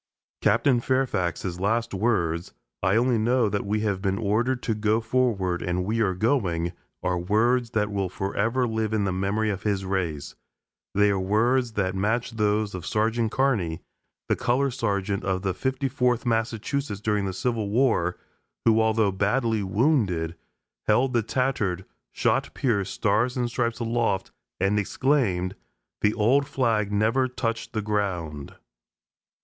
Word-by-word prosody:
Captain 130 -4 +3
Fairfax's 95 -9 -1
last 115 +4 0
words, 95 -6 0 0.3
"I 95 - +2
only 120 0 +3
know 120 +1 +2
we 105 +1 -1
have 100 -3 -1
been 95 -1 0
ordered 115 +4 0
to 115 - 0
go 110 +1 +1
forward, 110 -7 0
and 90 0 -1
we 110 +3 -1
are 95 -4 +1
going," 90 -7 0 0.3
are 90 -1 0
words 115 +6 +2
that 105 -1 +1
will 100 -2 -1
forever 110 +6 -1
live 110 -1 -1
in 110 -2 +1
the 100 - 0
memory 100 +3 0
of 95 -1 -4
his 100 -2 -1
race; 85 -7 -2 0.6
they 105 0 +4
are 100 - 0
words 115 +5 +1
that 95 -3 0
match 110 +6 0
those 105 -1 0
of 90 -2 -5
Sergeant 110 +3 0
Carney, 110 -13 0 0.4
the - - +2
color 135 +3 +1
sergeant 100 -5 -1
of 95 0 -1
the 95 -1 0
54th 130 -1 0
Massachusetts 115 +1 -1
during 105 -1 0
the 95 - -1
Civil 110 +1 -2
War, 110 -7 +2 0.5
who, 115 -1 +5
although 110 -2 +2
badly 110 +3 +1
wounded, 95 - +1 0.5
held 125 +5 +3
the 120 - +3
tattered, 110 -6 -1 0.3
shot - - 0
pierced 100 -7 0
Stars 115 +5 +1
and 120 -1 -1
Stripes 120 -1 -1
aloft 115 -4 -1 0.3
and 100 +3 +2
exclaimed, 100 -6 0 0.5
"The 105 0 +2
old 130 +6 +3
flag 110 -6 0
never 110 +6 +2
touched 115 -2 -3
the 110 -2 -2
ground!" 90 -9 -2
110 Hz, 145 wpm, -25 LUFS, 95-120 Hz, 0.6 s, who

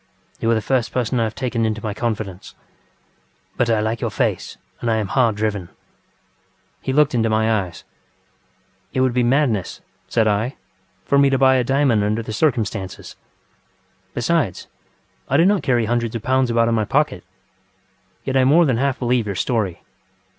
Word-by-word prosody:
You 115 - 0
are 115 - +4
the 110 - -1
first 130 -4 0
person 125 0 -1
I 115 - +2
have 110 - -5
taken 120 -3 -2
into 110 -1 -1
my 105 -2 -2
confidence. 105 -4 -4 1.0
But 120 - +1
I 110 -2 +2
like 110 +1 -2
your - - -1
face - - -2 0.2
and 120 - -2
I 110 - +2
am 105 -3 -2
hard 125 -5 +2
driven. 105 -4 -2
ŌĆØ - - -27 1.1
He - - -2
looked 150 +1 +3
into 115 -2 +1
my 110 -2 +1
eyes. 85 - -13 1.1
ŌĆ£It 130 - +2
would 130 -2 +1
be 125 - +2
madness, 120 - +1
ŌĆØ - - -38
said 110 -2 +2
I, 105 +5 0 0.5
ŌĆ£for 140 0 +4
me 140 - +5
to 135 - +2
buy 130 0 +5
a 125 - +2
diamond 135 -4 +2
under 105 +2 -1
the 110 - -6
circumstances. 110 -8 -2 1.0
Besides, - - 0 0.6
I 140 - +3
do 165 - +5
not 200 0 +3
carry 120 -4 +1
hundreds 120 0 -1
of 115 - -4
pounds 130 -1 +2
about 115 0 +2
in 115 - +1
my 110 -2 +1
pocket. - - 0 1.0
Yet 135 - -3
I 130 - +4
more 155 +6 +5
than 130 -6 +1
half 135 +1 0
believe 120 -3 0
your 100 - -3
story. 100 -4 -1
115 Hz, 185 wpm, -20 LUFS, 110-130 Hz, 1.1 s, me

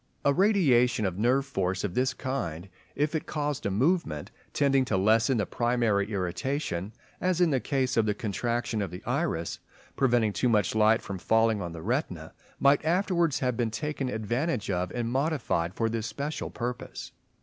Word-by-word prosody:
A 140 - +5
radiation 135 - +3
of 95 0 -2
nerve 130 +5 +2
force 95 -8 -2
of 100 -4 -2
this 130 +4 +1
kind, 95 - -4 0.3
if 150 +2 0
it 160 - -2
caused 150 -4 -2
a - - 0
movement 110 - 0 0.2
tending 135 -2 +3
to 110 - 0
lessen 110 +6 +3
the 105 - +1
primary 115 -4 +1
irritation, 95 - -2 0.3
as 180 -1 0
in 175 -3 +4
the 135 - +2
case 130 -1 0
of 110 -1 +3
the 105 - +1
contraction 115 +3 -2
of 100 - -2
the 90 +2 -9
iris 85 +1 -1 0.4
preventing 120 -5 +2
too 125 - +1
much 105 -3 +2
light 110 +1 +4
from 100 -2 -5
falling 110 +2 +2
on 85 -1 -5
the 80 -1 -8
retina, - - -2 0.3
might 140 +1 +4
afterwards 170 -2 +1
have 125 -2 0
been 120 -2 0
taken 140 +2 -3
advantage 120 +2 -1
of 90 -1 -1
and 120 +2 -3
modified 130 - 0
for 115 - +1
this 115 0 -2
special 140 +7 -4
purpose. 125 +1 -5
120 Hz, 175 wpm, -28 LUFS, 100-140 Hz, 0.4 s, A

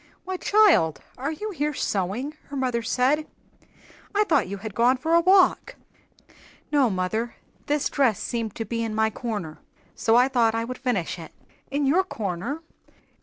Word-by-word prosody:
"Why, 375 0 -3
child, 355 - +4 0.2
are 275 +4 -3
you 420 +7 -5
here 300 -4 -2
sewing?" 215 - -2
her 280 - -9
mother 255 -3 0
said. 260 +6 +1 0.9
"I 420 - +4
thought 320 - +2
you 200 +2 -5
had 210 +1 -7
gone 245 +4 +3
for 320 +6 -1
a 335 - +6
walk." 380 +7 +4 1.0
"No, 280 -5 +4
mother; 215 +5 -2 0.3
this 290 -1 +1
dress 255 -8 +1
seemed 230 -4 -3
to 225 - -4
be 230 +2 -3
in 220 -1 -3
my 220 0 +2
'corner,' 205 -10 -5 0.3
so 225 - +2
I 250 +2 +6
thought 235 -4 +2
I 225 - 0
would 255 +1 -6
finish 205 -10 -1
it." 160 - -10 0.4
"In 285 +1 0
your 330 +8 +3
'corner'!" 225 - -4
250 Hz, 170 wpm, -25 LUFS, 220-295 Hz, 1.0 s, a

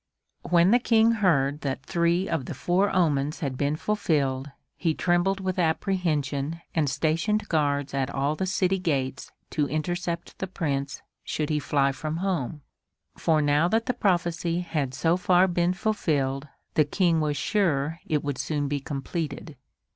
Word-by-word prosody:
When 175 +2 +5
the 245 - +6
King 230 -1 +4
heard 150 -10 +2
that 135 -1 -3
three 170 +3 +1
of 160 -6 -1
the - - -6
four 190 +3 +1
omens 150 -5 +1
had 135 -4 -2
been 140 +3 0
fulfilled, 145 -8 0 0.3
he 165 -3 0
trembled 180 +2 +1
with 185 -1 -2
apprehension 160 -4 0
and 155 -4 +1
stationed 165 - 0
guards 145 -3 0
at 135 -1 0
all 140 +2 0
the 190 +4 -2
city 190 0 +1
gates 140 -7 -2 0.2
to 150 -2 0
intercept 170 +2 -3
the 190 - -2
Prince 140 -6 -3 0.2
should 155 0 -2
he 150 - +1
fly 140 -1 +1
from 155 +4 -4
home; 165 -6 -2 0.5
for 155 -2 +2
now 145 +3 +3
that 225 +4 +1
the 250 - 0
prophecy 175 -3 0
had 150 -7 -2
so 165 +5 +2
far 180 0 +4
been 175 0 +1
fulfilled 150 -10 -1 0.3
the 155 - +4
King 165 +2 +2
was 150 -1 0
sure 165 -4 0
it 150 -2 0
would 145 -3 -3
soon 145 -2 -1
be 145 0 -1
completed. 140 +2 -5
160 Hz, 160 wpm, -26 LUFS, 145-180 Hz, 0.5 s, the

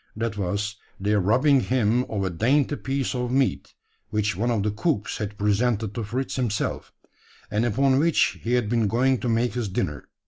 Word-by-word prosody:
That 115 0 -2
was, 100 +1 -2 0.2
their 105 +2 +1
robbing 130 +9 +4
him 125 -1 +1
of 100 -3 -2
a 95 - -1
dainty 135 - +2
piece 135 -2 -2
of 125 -1 -2
meat, 135 0 0 0.3
which 105 -2 0
one 115 +6 0
of 110 -4 +1
the 105 - 0
cooks 110 0 -1
had 105 -1 -4
presented 105 +1 +1
to 115 - -3
Fritz 125 +7 -3
himself; 115 -5 -2 0.6
and 110 +2 +1
upon 130 +3 +2
which 165 +1 +2
he 120 - -2
had 125 -3 +2
been 115 -1 +1
going 125 +4 +2
to 125 - -2
make 115 +1 +1
his 120 -4 -2
dinner. 75 -7 -3
115 Hz, 185 wpm, -25 LUFS, 105-125 Hz, 0.6 s, robbing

